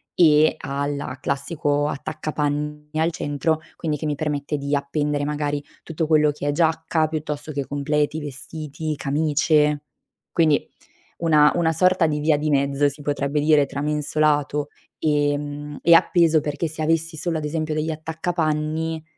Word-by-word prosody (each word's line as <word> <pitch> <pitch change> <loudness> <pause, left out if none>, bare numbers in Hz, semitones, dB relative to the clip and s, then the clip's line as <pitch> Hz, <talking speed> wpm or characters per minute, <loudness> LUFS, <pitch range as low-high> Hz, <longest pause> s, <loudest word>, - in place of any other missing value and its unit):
e 155 -2 +5
ha 140 -1 -3
la 140 -2 -4
classico 145 +1 -1
attaccapanni 150 0 -3
al 165 +1 +2
centro, 155 +1 -1 0.2
quindi 155 -2 -2
che 150 - -5
mi 150 -1 0
permette 150 0 -2
di 140 +1 -1
appendere, 145 +1 -1
magari, 145 -1 -2 0.2
tutto 160 -1 -3
quello 150 -2 +4
che 145 0 -5
è 145 - +2
giacca, 160 0 +1
piuttosto 150 -1 -4
che 140 -1 -2
completi, 145 +3 -1
vestiti, 155 +1 -5
camicie. 150 +1 +1 0.5
Quindi, 155 -4 +2 0.5
una 155 -3 +5
una 165 -2 +2
sorta 180 +1 +3
di 150 -1 -1
via 150 -1 +3
di 155 +1 -1
mezzo, 140 0 +2
si 145 +1 -8
potrebbe 145 0 -1
dire, 150 -2 +4
tra 140 - -5
mensolato, 150 -1 0 0.3
ehm, 145 -1 -1
e 170 - +7
appeso, 165 -2 +4
perché 150 +3 -2
se 155 +1 -5
avessi 165 +1 0
solo 165 0 -2
ad 155 - -5
esempio 155 0 -2
degli 155 +1 -1
attaccapanni, 160 0 -2
150 Hz, 150 wpm, -23 LUFS, 145-160 Hz, 0.5 s, e